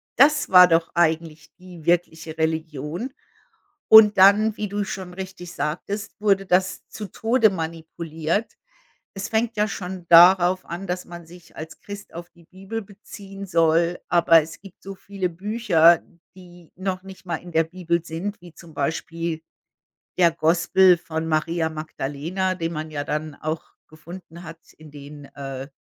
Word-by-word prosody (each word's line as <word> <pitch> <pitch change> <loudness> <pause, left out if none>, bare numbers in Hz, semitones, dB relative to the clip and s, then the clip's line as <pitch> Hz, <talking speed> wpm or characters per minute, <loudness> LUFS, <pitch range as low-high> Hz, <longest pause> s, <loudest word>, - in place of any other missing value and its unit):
Das 295 +4 +4
war 180 -1 +8
doch 165 -1 +1
eigentlich 160 -2 -1
die 180 -3 -13
wirkliche 165 -2 -1
Religion 160 - -3 0.8
und 215 -2 +8
dann, 205 +3 +5
wie 210 - -4
du 205 0 -2
schon 185 -2 -7
richtig 185 -2 -8
sagtest, 200 +8 -4
wurde 195 -2 +2
das 185 +1 0
zu 210 - -7
Tode 225 +4 +2
manipuliert. 165 +2 -4 0.6
Es 195 - -4
fängt 225 +1 -1
ja 210 0 +1
schon 185 -3 -7
darauf 180 +1 +6
an, 175 +3 -6
dass 180 0 -4
man 170 -1 -11
sich 175 0 -17
als 160 +1 -9
Christ 205 0 -10
auf 170 +1 -9
die 170 -1 -22
Bibel 195 +6 -7
beziehen 200 -1 -11
soll, 170 0 +2
aber 170 -2 +5
es 160 +2 -11
gibt 195 -2 -16
so 195 0 -8
viele 195 -1 -4
Bücher, 175 -3 +3 0.3
die 175 -2 -16
noch 185 0 -4
nicht 190 0 -13
mal 170 -2 -2
in 175 +2 -12
der 160 0 +3
Bibel 170 0 -3
sind, 175 +6 -6
wie 175 -2 -15
zum 165 -2 -15
Beispiel 165 +2 -3 0.8
der 170 -2 +5
Gospel 170 +3 +3
von 160 -2 -5
Maria 160 +1 0
Magdalena, 160 +4 -4
den 165 -1 -3
man 155 -1 -5
ja 145 -2 -4
dann 150 0 -4
auch 155 +1 -4 0.3
gefunden 170 +2 -12
hat 165 -1 -10 0.2
in 155 -1 -14
den, 145 0 -12
äh 135 -1 -7
175 Hz, 155 wpm, -23 LUFS, 160-190 Hz, 0.8 s, war